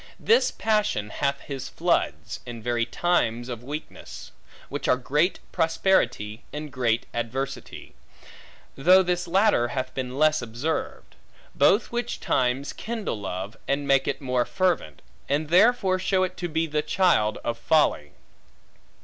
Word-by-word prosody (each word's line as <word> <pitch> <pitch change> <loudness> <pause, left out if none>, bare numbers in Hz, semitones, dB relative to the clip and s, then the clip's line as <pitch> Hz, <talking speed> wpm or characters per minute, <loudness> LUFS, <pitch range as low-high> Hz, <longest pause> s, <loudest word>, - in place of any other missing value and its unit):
This 465 +2 +4
passion 210 - 0
hath 140 -1 -1
his 135 -2 -6
floods, - - -1
in 115 -2 -8
very 120 -1 0
times 120 -7 0
of 120 -1 -6
weakness; 150 +4 -8 0.4
which - - -4
are 125 - +4
great 150 +8 +1
prosperity, 160 - +1
and 150 0 -6
great 120 -3 0
adversity; 125 - -5 0.8
though 185 +7 +6
this 175 0 -1
latter 190 - +3
hath 130 +1 -4
been 130 0 -4
less 155 0 +3
observed: 120 +7 -4 0.4
both 195 +10 +3
which 240 0 -3
times 130 +2 0
kindle 220 - -4
love, 95 +2 -5
and 140 +1 -1
make 135 -1 +3
it - - -2
more 125 -2 +1
fervent, 175 - -1 0.3
and 145 +2 0
therefore 185 0 +4
show 185 0 +1
it 185 0 -3
to 175 - -3
be 160 +1 0
the 150 -1 -1
child 150 - +2
of 120 - -1
folly. 115 - +2
140 Hz, 140 wpm, -25 LUFS, 120-180 Hz, 0.8 s, though